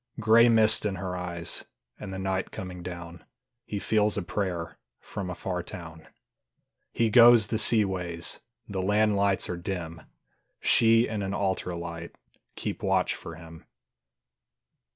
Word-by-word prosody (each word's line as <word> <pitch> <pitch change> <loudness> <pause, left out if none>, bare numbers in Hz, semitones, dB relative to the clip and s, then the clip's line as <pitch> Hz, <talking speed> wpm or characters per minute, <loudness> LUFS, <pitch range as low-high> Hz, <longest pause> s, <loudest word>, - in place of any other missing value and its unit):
Gray 115 +2 +6
mist 110 -1 +5
in 105 -2 -1
her 90 0 -4
eyes 85 -2 -3 0.4
And 100 - -7
the 95 - -5
night 95 0 -2
coming 90 -1 -8
down: 85 -1 -8 0.4
He 105 - -4
feels 105 0 +1
a 100 - -1
prayer 85 -4 -4 0.2
From 100 -3 -6
a 90 - -5
far 90 0 -3
town. 80 -2 -9 0.8
He 115 -2 +1
goes 120 -1 +7
the 110 +1 -2
sea 110 -3 +6
ways, 90 -3 -3 0.3
The 95 -2 -3
land 105 +2 +2
lights 100 -1 +1
are 90 - -4
dim; 85 -3 -5 0.6
She 115 +1 +4
and 110 -2 -3
an 95 0 -3
altar 95 -2 -2
light 85 0 -7 0.4
Keep - - -5
watch - - +1
for 85 - -9
him. 80 0 -13
95 Hz, 150 wpm, -27 LUFS, 85-105 Hz, 0.8 s, goes